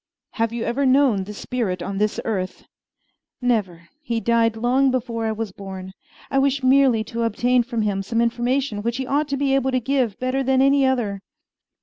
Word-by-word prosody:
"Have 230 -1 -1
you 235 -1 -3
ever 255 +5 -1
known 260 -7 +3
this 210 +1 -8
spirit 200 -8 -3
on 195 +2 -4
this 210 0 0
earth?" 190 -4 -3 0.7
"Never. 195 -9 -1
He 235 -6 -2
died 230 -1 +2
long 255 +4 +2
before 235 -3 -2
I - - 0
was 220 -2 -4
born. 190 -1 -8 0.4
I 270 - +3
wish 275 0 +1
merely 255 -4 +4
to 230 +2 -5
obtain 240 +2 +2
from 235 -2 -2
him 200 -2 0
some 230 +4 -2
information 240 0 0
which 235 +2 -2
he 265 - -3
ought 285 +3 0
to 280 -1 -2
be 275 -1 +1
able 270 -1 +2
to 255 -1 +1
give 250 -4 0
better 255 +1 -1
than 265 0 +2
any 275 0 +4
other." 220 -7 -1
235 Hz, 195 wpm, -22 LUFS, 215-265 Hz, 0.7 s, merely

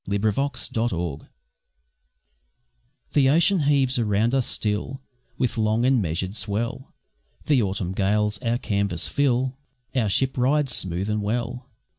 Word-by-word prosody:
An 100 - -1
Exile's 135 +7 0
Farewell 85 -10 -2 1.9
The 135 -3 +4
ocean 170 +6 +4
heaves 140 -3 +2
around 110 +2 +1
us 135 -3 +1
still 105 +5 -2 0.4
With 125 -2 -1
long 110 +2 +2
and 130 -2 +3
measured 90 +3 -2
swell, 115 +5 -3 0.5
The 145 -5 +3
autumn 95 -3 -2
gales 105 +2 +1
our 115 +2 0
canvas 100 -7 -1
fill, 130 -1 0 0.4
Our 115 -5 +2
ship 130 +6 +1
rides 135 +1 +2
smooth 90 +2 -2
and 105 0 -1
well. 120 +4 -3
115 Hz, 130 wpm, -24 LUFS, 100-130 Hz, 1.9 s, The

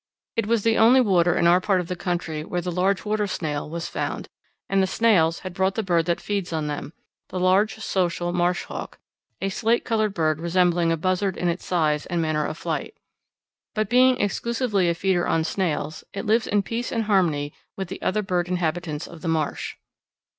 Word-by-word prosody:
It 230 -3 0
was 230 -2 +2
the 225 0 +3
only 240 +4 +7
water 180 -7 +3
in - - +2
our 175 +2 +5
part 195 -1 +2
of 180 - -3
the 180 - -3
country 170 -4 -3
where 175 - -3
the 180 +1 -3
large 185 +3 +1
water 210 0 0
snail 150 -6 -3
was 170 +2 -4
found, - - -4 0.4
and 195 0 +2
the 190 - +2
snails 185 -7 +3
had 185 -2 -6
brought 190 +2 +1
the 220 - -1
bird 170 -4 +1
that 170 - +1
feeds 200 -4 -3
on 160 -2 -1
them 150 +1 -4 0.4
the 185 - -4
large 190 +4 +3
social 175 -5 -1
marsh 175 0 +1
hawk, - - -7 0.4
a 195 - 0
slate 225 +4 +1
coloured 215 -3 0
bird 155 -2 +1
resembling 170 0 +2
a 165 - +1
buzzard 185 +3 0
in 175 - 0
its 170 +1 -3
size 155 -4 +1
and 175 -2 -1
manner 155 -2 0
of - - -5
flight. - - -3 0.8
But 215 -1 -1
being 255 +1 +5
exclusively 210 -2 0
a 170 - +1
feeder 180 0 +1
on 165 - +2
snails, 160 -3 -2
it 195 - -4
lives 220 +2 +2
in 205 -1 +2
peace 230 +5 -3
and 230 - 0
harmony 170 -9 +1 0.2
with 190 -1 -3
the - - -7
other 210 +2 0
bird 180 -2 0
inhabitants 170 -3 -2
of 170 -2 -12
the - - -4
marsh. 160 -2 -1
180 Hz, 205 wpm, -24 LUFS, 170-205 Hz, 0.8 s, only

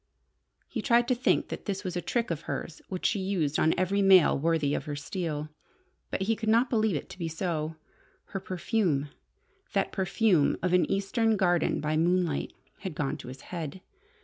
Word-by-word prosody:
He - - -4
tried 240 -1 +3
to - - +5
think 245 +1 +1
that - - -6
this 200 -1 -3
was 180 -2 -4
a 175 - -1
trick 235 +2 -1
of 165 -2 -2
hers 165 - -4
which 185 -2 -5
she 205 - +2
used 185 -7 0
on 160 - +3
every 195 +2 +1
male 190 -4 +6
worthy 155 -1 +1
of - - -2
her 145 - -4
steel. 155 -1 -4 0.6
But - - -2
he 225 +3 +1
could 220 0 -2
not 235 +3 +3
believe 220 -5 +2
it 145 - -4
to 185 - -11
be 170 - -2
so. 160 -1 -2 0.5
Her 195 - -3
perfume 185 - 0 0.6
that - - +1
perfume 190 -4 +2
of 180 -1 +1
an 180 - +3
Eastern 215 +3 +1
garden 175 -3 +2
by 155 +1 0
moonlight 175 -2 +1 0.3
had 190 -6 -5
gone 135 -2 -1
to - - -10
his 130 +2 -9
head. 170 -1 -6
180 Hz, 190 wpm, -28 LUFS, 155-200 Hz, 0.6 s, male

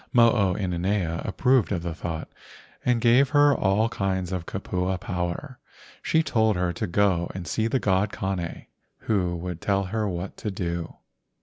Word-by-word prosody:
Mo 115 -3 +6
o 100 -5 +1
ina 90 -4 -2
nea 90 -3 0
approved 125 +3 +2
of 90 -4 -1
the 85 -1 -3
thought 80 0 -5 0.6
and 125 -1 +2
gaye 120 +3 +6
her 145 +1 +4
all 105 +2 +2
kinds 95 -4 -2
of 90 -3 -3
kupua 95 -1 -2
power. 90 - -4 0.4
She 160 - +2
told 110 -7 +2
her 90 -1 0
to - - -3
go 90 -2 +2
and 95 -2 -5
see 110 +6 0
the 125 - +1
god 100 -2 +1
Kane, 95 -3 -4 0.4
who 90 -5 0
would 85 0 -5
tell 100 -1 +1
her 110 -2 0
what 90 +1 -5
to 105 - -3
do. 85 -3 -4
95 Hz, 175 wpm, -25 LUFS, 90-110 Hz, 0.6 s, Mo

